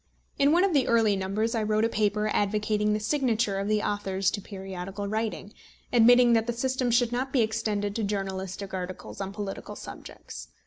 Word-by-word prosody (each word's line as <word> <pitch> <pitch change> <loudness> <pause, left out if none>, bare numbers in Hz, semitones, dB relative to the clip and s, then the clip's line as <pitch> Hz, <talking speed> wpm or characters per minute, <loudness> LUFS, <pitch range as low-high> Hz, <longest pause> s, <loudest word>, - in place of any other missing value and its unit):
In 280 +1 +5
one 345 +3 +4
of 390 -3 +2
the 275 -4 +3
early 225 -3 +3
numbers 195 +4 -1
I 225 - 0
wrote 215 +1 +1
a - - +3
paper 210 -1 0
advocating 210 +1 +1
the 210 - 0
signature 225 -4 0
of 200 - -2
the 215 0 +1
authors 195 -2 0
to 205 - -4
periodical 195 0 -6
writing, 215 -1 -3 0.4
admitting 240 +1 +6
that 225 0 +2
the 240 - 0
system 255 +1 -1
should 240 0 +3
not 255 +2 -2
be 265 - +3
extended 215 -2 -1
to 225 - -1
journalistic 195 -1 -4
articles 185 +1 -6
on 195 0 -4
political 200 -1 -6
subjects. - - -10
215 Hz, 185 wpm, -27 LUFS, 195-230 Hz, 0.4 s, admitting